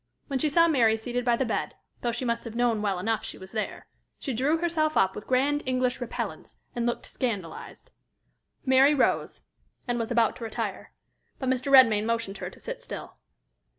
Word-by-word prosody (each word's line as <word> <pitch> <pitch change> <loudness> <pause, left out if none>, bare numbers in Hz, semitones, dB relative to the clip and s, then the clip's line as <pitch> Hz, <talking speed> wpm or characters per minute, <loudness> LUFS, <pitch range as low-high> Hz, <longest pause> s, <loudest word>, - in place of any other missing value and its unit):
When 275 -3 -2
she 305 - +2
saw 335 +3 +5
Mary 235 -8 +4
seated 245 +2 -3
by 240 -1 +3
the 265 - 0
bed, 230 - -2 0.3
though 240 - 0
she 240 +2 -3
must 235 -1 -1
have 230 -1 -7
known 235 -3 +2
well 200 -3 0
enough 220 +4 -1
she - - -6
was 190 0 -11
there, 215 -1 -4 0.3
she 270 - -4
drew 275 +7 +2
herself 320 -2 0
up 190 0 +3
with 210 - -8
grand 280 +3 +2
English 255 -1 0
repellence, 245 - -5 0.2
and 240 0 0
looked 240 - -2
scandalized. 200 -10 -5 0.7
Mary 265 +2 +5
rose, 265 - +1 0.5
and 240 -1 0
was 230 - -2
about 235 -2 +2
to 235 - -8
retire. 225 - -4 0.5
But 260 - -2
Mr. 260 +1 0
Redmain 225 -6 +7
motioned 230 -3 -2
her - - -4
to - - -16
sit - - -6
still. - - -8
245 Hz, 190 wpm, -27 LUFS, 225-270 Hz, 0.7 s, Redmain